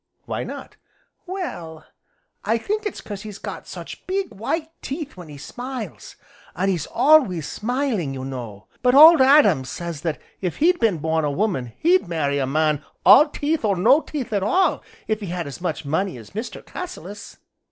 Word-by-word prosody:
"Why - - -3
not?" - - -9 0.5
"Well, 175 - -6 0.6
I 225 +3 +1
think 420 - -2
it's - - -6
'cause 205 -2 -7
he's 210 -2 -8
got - - -7
such - - -9
big, 385 +1 -2
white 310 - -3
teeth 285 +2 -5
when 175 -3 -11
he 145 - -10
smiles, 245 - -7 0.4
an' 190 +2 0
he's 175 -5 -1
always 245 - +4
smiling, 235 - -1
you 130 0 -5
know; 120 -6 -7 0.2
but 250 +1 +3
Old 315 +1 +10
Adam 260 - +6
says 165 +3 -6
that 165 -2 -2 0.2
if 180 -4 -2
he'd 350 +3 +3
been 220 -7 +2
born 160 +1 0
a 150 - +1
woman 140 - -1
he'd 355 - +3
marry 145 -4 0
a 135 - 0
man 150 +1 +1 0.2
all 300 - +8
teeth, 300 0 -1
or 205 -3 +2
no 240 - +5
teeth 275 -9 -5
at 200 - +1
all, 365 - +2 0.3
if 215 -1 0
he 205 - -6
had 175 0 -3
as 140 +4 -8
much 165 -4 -3
money 165 +3 -1
as 110 -3 -13
Mr. 220 +4 -6
Cassilis." 275 - -8
200 Hz, 180 wpm, -22 LUFS, -, 0.6 s, Old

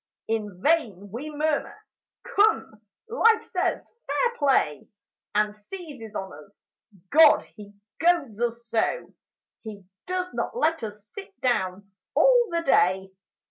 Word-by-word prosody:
In 210 -4 -3
vain 215 - +1
we 260 +8 -6
murmur; 300 -1 -1 0.5
"Come," 430 - +1 0.3
Life 450 -1 +3
says, 365 -4 -2
"Fair 485 -1 0
play!" 265 - +1 0.5
And 210 0 +2
seizes 240 - -10
on 190 -1 -5
us. 200 - -24 0.5
God! 310 0 +7
he 205 -1 -14 0.3
goads 320 -11 +1
us 235 0 -2
so! 230 - -1 0.5
He 210 -3 -9 0.2
does 365 0 -2
not - - -3
let 325 -9 +1
us 210 -2 -7
sit 395 - -11
down 200 -5 -1 0.2
all - - +5
the 335 -1 -1
day. 190 - +2
255 Hz, 125 wpm, -25 LUFS, -, 0.5 s, God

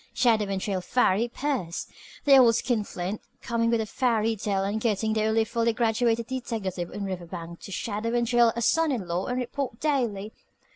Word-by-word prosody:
Shadow 225 -4 +3
and 195 -1 -2
trail 190 -1 -2
Farry 220 +2 +2
Pierce! 240 - -3 0.4
The 280 -1 +7
old 235 -3 +6
skin 235 -2 0
flint, 185 +1 -5 0.2
coming 230 0 0
with 230 -1 +2
a 220 - -1
fairy 225 -1 +1
tale 195 -2 -1
and 205 +3 -2
getting 220 -1 +1
the 215 -1 +1
only 220 +1 +3
fully 230 +1 0
graduated 230 0 +1
deteckative 215 -8 -4
in 205 - -4
Riverbank 170 -2 -6
to - - -10
shadow 225 +4 -2
and 240 0 +2
trail 240 -1 +4
a 235 - -1
son 325 +4 +3
in 220 -9 -2
law 175 +2 -2
and 250 - -1
report 250 -1 -3
daily! 235 -9 -1
225 Hz, 190 wpm, -26 LUFS, 200-240 Hz, 0.4 s, The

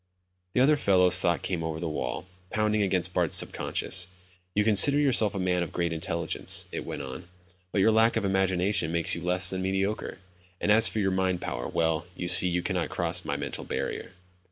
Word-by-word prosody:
The 125 - +2
other 145 +3 +4
fellow's 90 -7 +4
thoughts 85 -2 0
came 90 -3 -3
over 80 -1 -4
the 85 - -4
wall, 75 0 -4 0.2
pounding 110 -1 0
against 90 -2 0
Bart's 85 -3 +1
sub - - +3
conscious. 90 -1 -3 0.5
"You 105 - +2
consider 110 +7 +6
yourself 120 -8 +2
a - - -3
man 90 -1 0
of 85 - -4
great 85 -1 -2
intelligence," 80 0 -2
it - - -5
went - - -6
on, 65 +6 -9 0.4
"but 100 - 0
your 110 - +4
lack 110 +1 +3
of - - -1
imagination 95 -2 0
makes 85 0 +3
you 85 - -3
less 90 +1 +1
than 95 0 -3
mediocre. 95 +3 -2 0.4
And 105 - 0
as 110 +1 +6
for - - -4
your 95 -2 0
mind 95 -1 0
power, - - -5
well, 80 +1 -1
you 90 - -5
see 90 - +7
you 90 0 -1
cannot - - -2
cross - - -2
my - - -3
mental - - -4
barrier." - - -5
90 Hz, 205 wpm, -27 LUFS, 85-105 Hz, 0.5 s, see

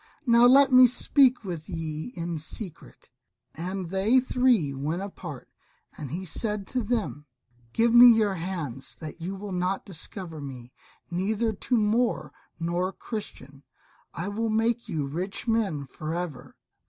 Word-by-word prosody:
now 235 0 +6
let 275 +2 +6
me 255 0 +9
speak 255 0 +3
with 170 -4 -6
ye 160 +3 -4
in 170 -1 -3
secret." 175 +3 -8 0.4
And 180 +2 -4
they 200 +7 +3
three 250 - +2
went 155 +7 -3
apart. 170 -9 -8 0.5
And 145 -4 -7
he 175 +7 -5
said 210 +3 -2
to 255 - +1
them, 210 -10 -2 0.4
"Give 230 - +2
me 240 +1 +10
your 215 -3 +3
hands 165 -8 -5
that 155 +1 -9
you 185 +4 -4
will 200 +1 -7
not 180 +1 -1
discover 175 -2 -6
me, 125 -3 -9 0.4
neither 215 +5 0
to 240 +4 0
Moor 225 +3 +1 0.3
nor 175 +3 -1
Christian! 140 - -8 0.5
I 170 +5 -3
will 225 +2 -2
make 225 +1 0
you 155 -6 -1
rich 180 - -4
men 205 -11 0
for 155 +4 -5
ever. 165 -8 -6
190 Hz, 145 wpm, -27 LUFS, 160-225 Hz, 0.5 s, me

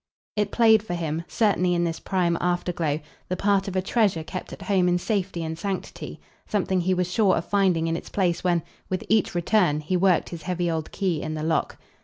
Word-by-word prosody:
It 210 -1 +1
played 220 -1 +5
for 190 -5 -4
him 165 -1 -2
certainly 185 -5 +2
in 170 - +1
this 165 -1 -2
prime 180 -3 0
afterglow 175 -3 0 0.3
the 185 - -1
part 200 0 +2
of 190 - -4
a 185 - +1
treasure 195 -6 +1
kept 185 +3 -6
at - - -8
home 190 -3 +2
in 175 0 +3
safety 190 -3 -2
and 160 0 -3
sanctity, 190 +3 -5 0.3
something 190 -3 0
he 185 +2 +1
was 180 0 -1
sure 200 -1 +3
of 165 - -2
finding 190 -5 +2
in 165 0 0
its - - -6
place 180 -3 0
when, 175 -3 +2 0.3
with 185 - -2
each 220 -4 +2
return, 175 -3 +2
he 155 +5 -2
worked 180 -1 +3
his 170 -2 -7
heavy 175 -1 -1
old 160 -1 -3
key 180 -6 -1
in 155 0 -4
the 155 - -4
lock. 160 0 0
180 Hz, 215 wpm, -25 LUFS, 170-195 Hz, 0.3 s, played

